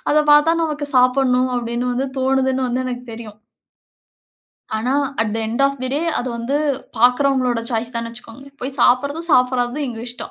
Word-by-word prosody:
அத 300 Hz, +1 st, +4 dB
பாத்தா 295 Hz, +3 st, +5 dB
நமக்கு 295 Hz, -2 st, -3 dB
சாப்பிடணும் 255 Hz, 0 st, +3 dB
அப்டின்னு 240 Hz, +1 st, -2 dB
வந்து 265 Hz, +3 st, -1 dB
தோணுதுன்னு 265 Hz, 0 st, +1 dB
வந்து 255 Hz, +1 st, -1 dB
எனக்கு 250 Hz, 0 st, -5 dB
தெரியும். 215 Hz, -2 st, -10 dB, 1.4 s
ஆனா, 245 Hz, +4 st, -1 dB, 0.3 s
அட் 215 Hz, -2 st, 0 dB
தே 225 Hz, -, -2 dB
எண்ட் 235 Hz, +5 st, -1 dB
ஆஃப் 275 Hz, -1 st, 0 dB
தே 255 Hz, -, -1 dB
டே 290 Hz, -, 0 dB, 0.2 s
அது 250 Hz, -, -3 dB
வந்து 235 Hz, +5 st, -2 dB, 0.4 s
பாக்கிறவர்களோட 250 Hz, 0 st, +2 dB
சாய்ஸ் 235 Hz, +2 st, -2 dB
தானு 230 Hz, 0 st, -3 dB
வச்சிகோங்க. 235 Hz, +2 st, -11 dB, 0.2 s
போய் 260 Hz, +2 st, -4 dB
சாப்பிறதும், 280 Hz, +6 st, +2 dB
சாப்பிடாததும் 250 Hz, +2 st, +2 dB
எங்க 230 Hz, -2 st, -6 dB
இஷ்டம். 245 Hz, -, -7 dB
250 Hz, 165 wpm, -19 LUFS, 240-270 Hz, 1.4 s, பாத்தா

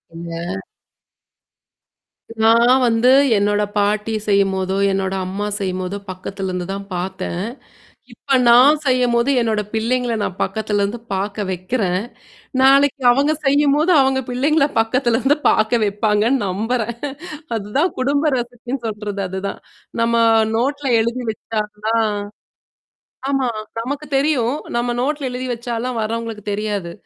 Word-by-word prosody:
இந்த 170 Hz, +3 st, -5 dB, 1.8 s
நான் 230 Hz, +2 st, +5 dB
வந்து 230 Hz, +2 st, +3 dB, 0.3 s
என்னோட 205 Hz, +1 st, +2 dB, 0.2 s
பாட்டி 210 Hz, +2 st, 0 dB
செய்யும்போதோ, 195 Hz, -1 st, +1 dB
என்னோட 190 Hz, 0 st, -1 dB
அம்மா 195 Hz, +3 st, -3 dB
செய்யும்போதோ 185 Hz, 0 st, -3 dB
பக்கத்தலருந்து 185 Hz, -1 st, -5 dB
தான் 200 Hz, 0 st, -5 dB
பார்த்தேன். 185 Hz, 0 st, -4 dB, 0.7 s
இப்ப 270 Hz, -, 0 dB
நான் 265 Hz, +6 st, +7 dB
செய்யும்போது 250 Hz, -1 st, +2 dB
என்னோட 220 Hz, -2 st, 0 dB
பிள்ளைங்கள 240 Hz, +2 st, 0 dB
நான் 185 Hz, -, -4 dB
பக்கத்துலருந்து 210 Hz, 0 st, -1 dB
பார்க்க 200 Hz, +1 st, -2 dB
வைக்கிறேன். 185 Hz, 0 st, -1 dB, 0.6 s
நாளைக்கு 275 Hz, 0 st, +4 dB
அவங்க 280 Hz, +5 st, +2 dB
செய்யும்போது 290 Hz, +4 st, +3 dB
அவங்க 265 Hz, 0 st, +2 dB
பிள்ளைங்கள 280 Hz, +4 st, +2 dB
பக்கத்தலருந்து 250 Hz, +4 st, +2 dB
பார்க்க 220 Hz, +2 st, +2 dB
வைப்பாங்கன்னு 210 Hz, +4 st, +1 dB
நம்புறேன். 225 Hz, +5 st, -1 dB, 0.6 s
அதுதான் 225 Hz, -, 0 dB
குடும்ப 285 Hz, +3 st, +1 dB
ரெசிபின்னு 245 Hz, +1 st, -5 dB
சொல்றது 210 Hz, -2 st, -4 dB
அதுதான். 190 Hz, +1 st, -4 dB, 0.4 s
நம்ம 235 Hz, 0 st, +2 dB, 0.4 s
நோட்ல 280 Hz, +3 st, -1 dB
எழுதி 235 Hz, +2 st, -2 dB
வச்சா 215 Hz, +1 st, -4 dB, 0.3 s
தான். 225 Hz, -2 st, +2 dB, 1.2 s
ஆமா. 270 Hz, -2 st, +1 dB, 0.3 s
நமக்கு 280 Hz, +5 st, -4 dB
தெரியும். 275 Hz, -2 st, +1 dB, 0.2 s
நம்ம 240 Hz, +1 st, 0 dB
நோட்ல 285 Hz, +2 st, -1 dB
எழுதி 250 Hz, +1 st, -5 dB
வச்சாலாம் 240 Hz, +1 st, -3 dB
வர்றவங்களுக்கு 225 Hz, -1 st, -3 dB
தெரியாது. 205 Hz, -4 st, -3 dB
225 Hz, 110 wpm, -19 LUFS, 200-255 Hz, 1.8 s, நான்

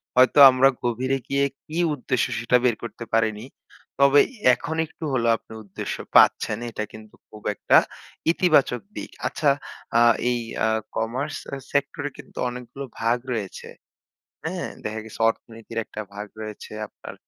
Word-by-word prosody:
হয়তো 130 Hz, +3 st, +5 dB
আমরা 130 Hz, +1 st, +5 dB
গভীরে 125 Hz, +3 st, 0 dB
গিয়ে 140 Hz, 0 st, +2 dB, 0.2 s
কি 155 Hz, -, -6 dB, 0.2 s
উদ্দেশ্য? 130 Hz, -3 st, 0 dB
সেটা 120 Hz, +1 st, +3 dB
বের 120 Hz, -3 st, +3 dB
করতে 115 Hz, 0 st, -7 dB
পারিনি। 110 Hz, 0 st, +1 dB, 0.5 s
তবে 140 Hz, +1 st, +6 dB, 0.3 s
এখন 155 Hz, +6 st, -3 dB
একটু 160 Hz, -, -13 dB
হলেও 120 Hz, -3 st, +3 dB
আপনি 110 Hz, -, -15 dB
উদ্দেশ্য 100 Hz, -2 st, -5 dB, 0.2 s
পাচ্ছেন -, -, +5 dB
এটা 110 Hz, -, -3 dB
কিন্তু 110 Hz, -1 st, -13 dB
খুব 105 Hz, -, -13 dB
একটা -, -, +4 dB, 0.5 s
ইতিবাচক 155 Hz, -8 st, +3 dB
দিক। -, -, -6 dB, 0.2 s
আচ্ছা 150 Hz, -, +1 dB, 0.5 s
আ -, -, +5 dB, 0.3 s
এই 120 Hz, -1 st, +1 dB, 0.3 s
আ -, -, +3 dB, 0.3 s
কমার্স 130 Hz, +7 st, -2 dB
স -, -, -17 dB, 0.3 s
সেক্টরে 140 Hz, +1 st, -1 dB
কিন্তু -, -, -14 dB
অনেকগুলো 125 Hz, +3 st, -7 dB, 0.2 s
ভাগ 115 Hz, +2 st, +2 dB, 0.2 s
রয়েছে। 105 Hz, -5 st, -5 dB, 0.8 s
হ্যাঁ? -, -, -3 dB, 0.2 s
দেখা 110 Hz, +1 st, -3 dB
গেছে 110 Hz, -, -11 dB
অর্থনীতির 115 Hz, 0 st, -6 dB
একটা 105 Hz, -, -7 dB
ভাগ 105 Hz, +1 st, -6 dB
রয়েছে। 110 Hz, -1 st, -8 dB, 0.2 s
আপনার -, -, -11 dB
120 Hz, 145 wpm, -24 LUFS, 110-140 Hz, 0.8 s, তবে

